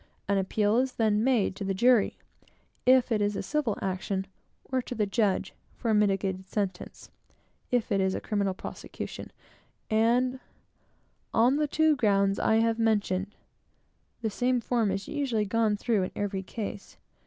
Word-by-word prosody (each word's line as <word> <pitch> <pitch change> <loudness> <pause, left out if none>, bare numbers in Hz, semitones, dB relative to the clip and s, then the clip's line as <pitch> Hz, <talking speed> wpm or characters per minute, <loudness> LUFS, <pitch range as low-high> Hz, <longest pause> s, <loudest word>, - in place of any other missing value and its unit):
An 200 0 +2
appeal 205 +3 +1
is 255 +1 +1
then 215 -1 +1
made 240 -7 +2
to 200 - -5
the 195 0 -1
jury, 235 +1 +3 0.7
if 255 -1 +5
it 215 -2 +2
is 205 0 0
a - - -3
civil 290 -9 -1
action, 190 0 -2 0.5
or 260 -1 +1
to 250 - -7
the 215 - +1
judge 200 -1 0 0.2
for 230 - -1
a - - +3
mitigated 195 -2 +1
sentence, 190 -3 -4 0.6
if 245 -2 0
it 195 -1 +2
is 190 0 +1
a - - -2
criminal 200 -3 -1
prosecution, - - -7 0.6
on 245 +4 +2 0.9
the 270 +7 +3
two 315 0 +3
grounds 200 -5 +2
I 220 - +3
have 225 0 +2
mentioned. 205 -3 0 0.9
The 220 - 0
same 250 +3 +1
form 230 -2 0
is 195 +1 -3
usually 260 -8 -1
gone 215 0 +1
through 215 -1 +1
in 185 - -2
every 200 -2 -2
case. 200 +1 -7
215 Hz, 155 wpm, -28 LUFS, 195-240 Hz, 0.9 s, if